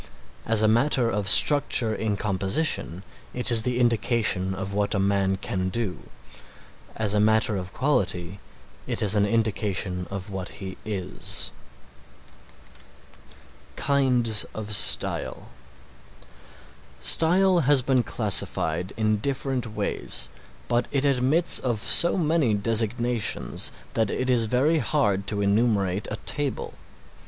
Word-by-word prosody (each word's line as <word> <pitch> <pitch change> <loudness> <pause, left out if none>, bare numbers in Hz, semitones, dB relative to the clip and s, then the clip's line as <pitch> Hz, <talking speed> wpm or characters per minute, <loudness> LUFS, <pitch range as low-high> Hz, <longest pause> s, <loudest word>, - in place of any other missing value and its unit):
As 110 -1 +2
a - - +4
matter 120 +1 +2
of 100 -2 -2
structure 130 -3 +4
in 110 -2 -3
composition 95 - -1 0.3
it 125 0 0
is 115 -1 +8
the 125 +2 -2
indication 115 -5 0
of 95 +1 -6
what 105 +1 -1
a - - 0
man 95 0 0
can 95 -1 -4
do; 110 -3 -5 0.9
as 105 -2 -1
a 105 - +1
matter 110 +1 +2
of 90 -1 -6
quality 100 - -2 0.5
it - - -3
is 105 -1 +2
an 105 -1 +2
indication 100 -5 -2
of 100 +1 -7
what 95 -2 -7
he 95 -1 -8
is. 95 -3 -4 2.2
KINDS 125 -6 +3
OF 110 -1 -6
STYLE 100 - +2 1.5
Style 180 +2 +4
has 145 -3 +3
been 130 -1 +1
classified 100 -4 0
in 110 -1 0
different 135 +1 -3
ways, - - -2 0.4
but 120 0 -1
it 140 0 -1
admits 140 +5 +4
of 120 -3 -2
so 170 - +3
many 155 - +1
designations 115 +2 -1 0.2
that 110 -3 0
it 130 +4 -2
is 120 -2 +2
very 140 +8 +1
hard 100 -11 -1
to 105 -1 -2
enumerate 100 -2 0
a 110 - -4
table. 145 -3 -3
110 Hz, 125 wpm, -24 LUFS, 100-125 Hz, 2.2 s, is